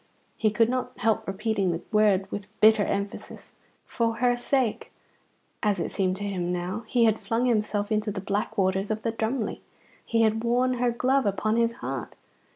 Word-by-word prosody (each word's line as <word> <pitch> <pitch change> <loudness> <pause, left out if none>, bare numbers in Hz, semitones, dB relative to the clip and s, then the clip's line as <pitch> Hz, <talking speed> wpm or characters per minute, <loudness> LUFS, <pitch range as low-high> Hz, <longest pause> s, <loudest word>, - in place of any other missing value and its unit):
He 220 - +2
could 225 +2 +3
not 255 0 -2
help 220 0 0
repeating 195 0 -1
the 165 - -3
word 210 -3 +3
with 205 -1 -5
bitter 220 -1 +6
emphasis. 200 0 -4 0.3
For 230 -2 -1
her 245 +1 +2
sake, 245 -1 -1 0.7
as 205 -3 +1
it 170 - -2
seemed 185 -2 0
to 200 - -6
him 180 -3 -2
now, 180 +5 -3
he 240 -1 +3
had 220 -1 +2
flung 235 +2 -1
himself 215 -3 0
into 215 0 0
the 200 -1 -3
black 205 +3 -2
waters 190 +1 +1
of 215 0 -2
the 230 - 0
Drumly. 225 +1 -2 0.4
He 230 0 +1
had 220 +1 +1
worn 250 +1 +1
her 245 0 +2
glove 255 +1 +1
upon 215 +2 0
his 230 0 +2
heart. 130 -2 -4
215 Hz, 180 wpm, -26 LUFS, 200-235 Hz, 0.7 s, bitter